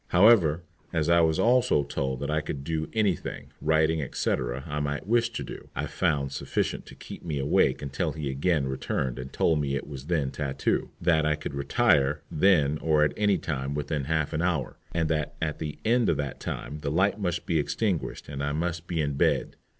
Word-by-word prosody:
However, 90 Hz, -5 st, +5 dB, 0.3 s
as 80 Hz, -1 st, 0 dB
I 85 Hz, 0 st, +6 dB
was 80 Hz, -1 st, +3 dB
also 120 Hz, -, +3 dB
told 65 Hz, -2 st, -3 dB
that 70 Hz, +1 st, -2 dB
I 75 Hz, 0 st, +1 dB
could 75 Hz, -2 st, -5 dB
do 80 Hz, +1 st, -2 dB
any 105 Hz, -5 st, +2 dB
thing -, -, -8 dB
writing, 80 Hz, 0 st, +2 dB
etc. 65 Hz, -1 st, -2 dB
I 75 Hz, -2 st, -3 dB
might 75 Hz, -1 st, -2 dB
wish 115 Hz, +2 st, +2 dB
to -, -, -5 dB
do, -, -, -9 dB
I -, -, -1 dB
found 70 Hz, -2 st, 0 dB
sufficient -, -, -2 dB
to -, -, -11 dB
keep -, -, -10 dB
me 80 Hz, -4 st, -3 dB
awake 70 Hz, +1 st, +2 dB
until 70 Hz, -1 st, -2 dB
he 75 Hz, -2 st, -4 dB
again 70 Hz, +2 st, +1 dB
returned 65 Hz, -1 st, -2 dB
and 65 Hz, +1 st, -7 dB
told 80 Hz, -3 st, +2 dB
me 70 Hz, -1 st, -1 dB
it 70 Hz, -, -3 dB
was 70 Hz, -2 st, -8 dB
then 75 Hz, -6 st, 0 dB
tattoo, 70 Hz, -2 st, -1 dB
that 85 Hz, -3 st, +3 dB
I 75 Hz, 0 st, +2 dB
could 75 Hz, -1 st, -6 dB
retire 70 Hz, +1 st, +2 dB
then 75 Hz, -4 st, +3 dB
or 75 Hz, -2 st, +3 dB
at 75 Hz, -, +2 dB
any 105 Hz, -2 st, +2 dB
time 70 Hz, -3 st, -3 dB
within 75 Hz, -1 st, -2 dB
half 80 Hz, +1 st, 0 dB
an 80 Hz, -, 0 dB
hour, 85 Hz, -6 st, -1 dB
and 85 Hz, -1 st, 0 dB
that 75 Hz, -3 st, -1 dB
at 75 Hz, -2 st, -2 dB
the 75 Hz, -2 st, -4 dB
end 120 Hz, +1 st, +3 dB
of -, -, +2 dB
that 70 Hz, -3 st, -4 dB
time 75 Hz, -, -5 dB
the 75 Hz, -2 st, -3 dB
light 95 Hz, +7 st, +2 dB
must 90 Hz, -3 st, -2 dB
be 85 Hz, -3 st, +1 dB
extinguished 90 Hz, +3 st, -2 dB
and 70 Hz, -1 st, -5 dB
I 70 Hz, 0 st, -1 dB
must 85 Hz, +1 st, -2 dB
be 85 Hz, -3 st, -1 dB
in 70 Hz, -1 st, -1 dB
bed. 70 Hz, -, +1 dB
75 Hz, 210 wpm, -27 LUFS, 70-85 Hz, 0.3 s, I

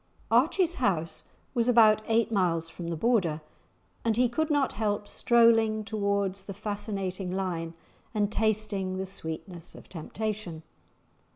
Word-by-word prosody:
Archie's 325 Hz, +9 st, +3 dB
house 165 Hz, -8 st, 0 dB, 0.3 s
was 235 Hz, -2 st, +1 dB
about 220 Hz, -3 st, +6 dB
eight 225 Hz, 0 st, +2 dB
miles 170 Hz, -5 st, +1 dB
from 170 Hz, +1 st, -7 dB
the 170 Hz, -, -2 dB
Border, 175 Hz, -5 st, +1 dB, 0.6 s
and 225 Hz, -1 st, +1 dB
he 250 Hz, 0 st, +4 dB
could 315 Hz, +6 st, -1 dB
not 290 Hz, -3 st, +2 dB
help 205 Hz, -1 st, -1 dB
strolling 225 Hz, -2 st, +3 dB
towards 200 Hz, -2 st, -1 dB
the 195 Hz, -, -7 dB
fascinating 200 Hz, -3 st, -4 dB
line 175 Hz, -3 st, -3 dB, 0.4 s
and 210 Hz, -2 st, 0 dB
tasting 210 Hz, -4 st, 0 dB
the 190 Hz, -, -2 dB
sweetness 170 Hz, -1 st, -7 dB
of -, -, -13 dB
temptation. 185 Hz, -1 st, -5 dB
205 Hz, 130 wpm, -28 LUFS, 185-225 Hz, 0.6 s, about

